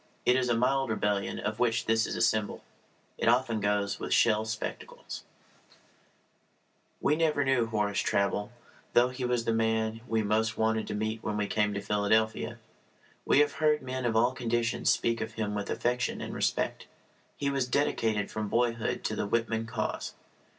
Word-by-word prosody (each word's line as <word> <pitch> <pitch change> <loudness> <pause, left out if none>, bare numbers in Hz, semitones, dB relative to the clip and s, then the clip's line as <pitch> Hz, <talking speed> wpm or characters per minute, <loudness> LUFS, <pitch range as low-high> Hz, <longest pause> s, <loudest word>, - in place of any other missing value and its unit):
It 125 - +5
is 130 -1 +1
a 120 - +2
mild 135 +1 +2
rebellion 105 -2 0
of 105 +1 -3
which 115 -2 +1
this 115 0 +2
is 115 - +2
symbol. 110 -2 -1 0.6
It - - 0
often 120 -2 +2
goes 100 0 0
with - - 0
shell 110 -1 +3
spectacles. 110 0 -6 1.8
We 150 - +2
never 155 -3 +2
knew 130 -4 +2
Horace 105 -2 0
Traubel, 100 +1 0 0.4
though 120 +1 +5
he 125 0 -4
was 125 -1 0
the 115 - +1
man 110 0 0
we 110 -1 +1
most 110 +2 +1
wanted 110 0 +1
to - - -3
meet 110 +1 -2
when 105 -1 -2
we 105 - 0
came 105 0 0
to 100 - -2
Philadelphia. 105 +2 +1 0.7
We 145 - +5
have 145 - +3
heard 150 -2 +3
men 130 0 -3
of 115 -2 0
all 120 +3 +4
conditions 120 -2 0
speak 115 -1 +1
of 110 - -4
him 105 -2 -2
with 105 -1 -3
affection 125 +1 -1
and - - -5
respect. - - -1 0.5
He 140 -1 0
was 135 -2 0
dedicated 115 -7 0
from 110 -1 -3
boyhood 115 0 0
to - - -1
the - - -2
Whitman 115 0 0
cause. 115 - -3
115 Hz, 170 wpm, -29 LUFS, 110-125 Hz, 1.8 s, It